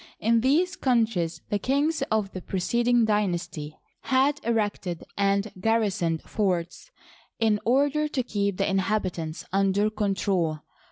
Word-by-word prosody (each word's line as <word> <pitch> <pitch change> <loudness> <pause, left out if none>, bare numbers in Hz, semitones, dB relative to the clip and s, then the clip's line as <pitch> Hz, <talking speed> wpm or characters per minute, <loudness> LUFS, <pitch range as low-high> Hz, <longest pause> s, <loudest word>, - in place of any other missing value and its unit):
In 230 +1 +3
these 335 +9 +2
countries 225 -10 0
the 205 - 0
kings 285 +6 0
of 215 -3 0
the 185 - -6
preceding 235 +6 +1
aynasty 175 -7 -1 0.3
had 270 +3 +2
erected 205 -6 -1
and 200 +1 +1
garrisoned 190 -6 0
forts 180 - -2 0.5
in 220 -2 +2
order 285 +5 +2
to 270 -4 -2
keep 200 -4 -1
the 195 - +1
inhabitants 185 -5 -1
under 195 +2 +2
control. 190 -6 0
210 Hz, 120 wpm, -26 LUFS, 185-235 Hz, 0.5 s, In